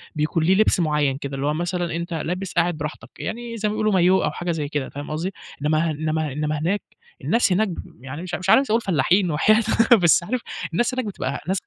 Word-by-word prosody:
بيكون 155 Hz, +2 st, 0 dB
ليه 185 Hz, +4 st, +4 dB
لِبس 215 Hz, -1 st, +3 dB
معيّن 150 Hz, -4 st, +1 dB
كده 140 Hz, -1 st, -5 dB
اللي 135 Hz, +1 st, -3 dB
هو 150 Hz, -, +1 dB
مثلًا 175 Hz, +1 st, -2 dB
أنت 170 Hz, +1 st, -4 dB
لابس 180 Hz, +4 st, -3 dB
قاعد 175 Hz, -1 st, +1 dB
براحتك 150 Hz, 0 st, -6 dB
يعني 235 Hz, 0 st, -5 dB
زي 210 Hz, -1 st, 0 dB
ما -, -, -2 dB
بيقولوا 215 Hz, -1 st, +1 dB
مايوه 185 Hz, +1 st, +4 dB
أو -, -, 0 dB
حاجة 175 Hz, 0 st, -3 dB
زي 155 Hz, -3 st, -2 dB
كده 145 Hz, -2 st, -3 dB
فاهم 145 Hz, +1 st, -7 dB
قصدي، 170 Hz, +6 st, -3 dB, 0.3 s
إنما 155 Hz, +2 st, +1 dB
إنما 155 Hz, 0 st, -2 dB
إنما 150 Hz, +2 st, -2 dB
هناك 185 Hz, +7 st, 0 dB, 0.4 s
الناس، 230 Hz, -4 st, +2 dB
هناك 210 Hz, +4 st, +3 dB
ب 165 Hz, -, -9 dB
يعني 135 Hz, +4 st, -6 dB
مش 180 Hz, -1 st, -7 dB
مش 185 Hz, +1 st, -4 dB
عايز 270 Hz, +3 st, +5 dB
أقول 230 Hz, +2 st, +3 dB
فلّاحين 180 Hz, +1 st, +2 dB
وحياة 215 Hz, +9 st, +4 dB, 0.3 s
أ -, -, +10 dB
بس 175 Hz, -3 st, +4 dB
عارف 245 Hz, +7 st, -2 dB, 0.3 s
الناس 240 Hz, +8 st, +1 dB
هناك 255 Hz, -1 st, -2 dB
بتبقى 140 Hz, -9 st, -4 dB
ناس 190 Hz, +2 st, +1 dB
170 Hz, 225 wpm, -23 LUFS, 150-195 Hz, 0.4 s, أ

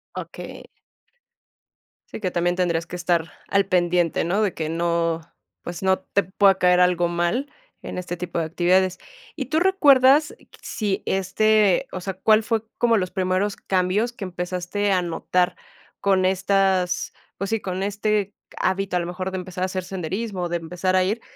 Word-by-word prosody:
Okey. -, -, -8 dB, 1.5 s
Sí, -, -, -7 dB
que 185 Hz, -4 st, -2 dB
también 175 Hz, +1 st, 0 dB
tendrías 170 Hz, -2 st, 0 dB
que -, -, -8 dB
estar 170 Hz, -2 st, 0 dB, 0.2 s
al 195 Hz, 0 st, +2 dB
pendiente, 175 Hz, -2 st, +1 dB
¿no?, 190 Hz, +5 st, +1 dB
de 205 Hz, -5 st, +1 dB
que 155 Hz, -1 st, -3 dB
no, 170 Hz, 0 st, 0 dB, 0.4 s
pues, 175 Hz, 0 st, -7 dB
no 190 Hz, 0 st, +3 dB
te 200 Hz, +1 st, 0 dB
pueda 195 Hz, +2 st, +3 dB
caer 180 Hz, -1 st, +3 dB
algo 180 Hz, -1 st, +3 dB
mal 175 Hz, +12 st, -1 dB, 0.3 s
en -, -, -6 dB
este 175 Hz, -1 st, -4 dB
tipo 180 Hz, -1 st, -5 dB
de 165 Hz, -, 0 dB
actividades. 185 Hz, +3 st, +2 dB, 0.4 s
¿Y 275 Hz, -, -3 dB
tú 310 Hz, +5 st, +1 dB
recuerdas 295 Hz, -6 st, +5 dB
q -, -, -24 dB
si 205 Hz, -3 st, -2 dB
este, 200 Hz, +1 st, +2 dB
o 185 Hz, -, -5 dB
sea, 195 Hz, +1 st, -4 dB
cuál 215 Hz, +3 st, +3 dB
fue 225 Hz, -1 st, -1 dB
como 235 Hz, -2 st, +3 dB
los 185 Hz, -2 st, -2 dB
primeros 190 Hz, +2 st, 0 dB
cambios 190 Hz, +5 st, 0 dB
que 210 Hz, -, -7 dB
empezaste 180 Hz, +3 st, -2 dB
a 185 Hz, -2 st, +3 dB
notar 180 Hz, +1 st, 0 dB, 0.5 s
con 190 Hz, -2 st, +2 dB
estas 190 Hz, -1 st, +1 dB, 0.2 s
pues 195 Hz, +1 st, -3 dB
sí, 225 Hz, -, 0 dB
con 185 Hz, -1 st, -4 dB
este 205 Hz, 0 st, -1 dB, 0.2 s
hábito, 190 Hz, 0 st, 0 dB
a -, -, +1 dB
lo 170 Hz, -, -3 dB
mejor 185 Hz, +2 st, -4 dB
de 190 Hz, -, -3 dB
empezar 185 Hz, 0 st, -5 dB
a -, -, +3 dB
hacer 185 Hz, 0 st, -3 dB
senderismo, 185 Hz, +1 st, -4 dB
de 175 Hz, 0 st, -1 dB
empezar 180 Hz, +3 st, -2 dB
a 185 Hz, -, +4 dB
ir, 210 Hz, +5 st, -1 dB
185 Hz, 175 wpm, -23 LUFS, 175-200 Hz, 1.5 s, recuerdas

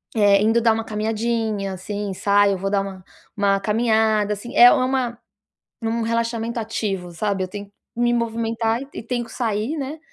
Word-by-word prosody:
eh, 200 Hz, -2 st, +5 dB
indo 225 Hz, +2 st, +3 dB
dar 230 Hz, 0 st, +4 dB
uma 220 Hz, 0 st, -1 dB
caminhadinha, 220 Hz, -2 st, -2 dB
assim, 200 Hz, +2 st, -4 dB
saio, 200 Hz, +1 st, +3 dB
vou 195 Hz, +2 st, -2 dB
dar 200 Hz, -, +2 dB
uma 190 Hz, -1 st, -7 dB, 0.3 s
uma 200 Hz, -1 st, +2 dB
caminhada, 220 Hz, 0 st, +2 dB
assim, 210 Hz, +4 st, -8 dB
é 245 Hz, +1 st, +9 dB
uma 255 Hz, -3 st, 0 dB, 0.7 s
um 225 Hz, +1 st, -1 dB
relaxamento 230 Hz, 0 st, -1 dB
ativo, 200 Hz, -5 st, -3 dB
sabe, 195 Hz, +3 st, -1 dB
eu -, -, -3 dB
tenho 205 Hz, +2 st, -7 dB
que -, -, -29 dB, 0.2 s
me 240 Hz, 0 st, +2 dB
movimentar 230 Hz, 0 st, -1 dB
e 275 Hz, -, -8 dB
e -, -, -6 dB
tenho 240 Hz, +1 st, -2 dB
que -, -, -14 dB
sair, 225 Hz, +5 st, -2 dB
né, 290 Hz, +2 st, -5 dB
220 Hz, 180 wpm, -22 LUFS, 200-235 Hz, 0.7 s, é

